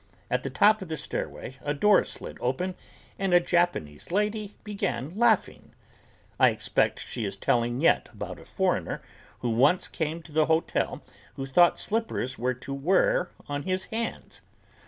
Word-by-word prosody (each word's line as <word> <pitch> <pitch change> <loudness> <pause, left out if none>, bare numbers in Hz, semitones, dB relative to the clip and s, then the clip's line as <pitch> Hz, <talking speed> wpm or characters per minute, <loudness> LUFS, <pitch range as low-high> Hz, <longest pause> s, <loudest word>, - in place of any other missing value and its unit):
At 125 - +1
the 135 - -4
top 210 +11 +4
of 190 - -6
the 160 -1 -3
stairway 135 -3 -5
a 145 0 -2
door 210 +6 +5
slid - - -8
open 175 +10 -1 0.5
and 190 -2 +2
a - - +8
Japanese 170 - 0
lady 210 +1 -1
began 165 - -3
laughing. 225 -2 +1 0.6
I - - +7
expect - - 0
she 120 - -4
is 100 -1 -3
telling 120 +3 +1
yet 165 - +3
about - - -7
a - - -14
foreigner - - -1 0.4
who 120 - 0
once 140 +10 +3
came 160 0 -3
to 160 - -14
the 155 0 +3
hotel 160 +1 0 0.3
who 135 - -4
thought 170 +6 +5
slippers 215 - -2
were 125 +2 0
to 130 +3 -7
wear 180 +5 +2 0.2
on 145 0 -2
his 185 +3 -2
hands. 230 0 -4
160 Hz, 160 wpm, -27 LUFS, 130-190 Hz, 0.6 s, a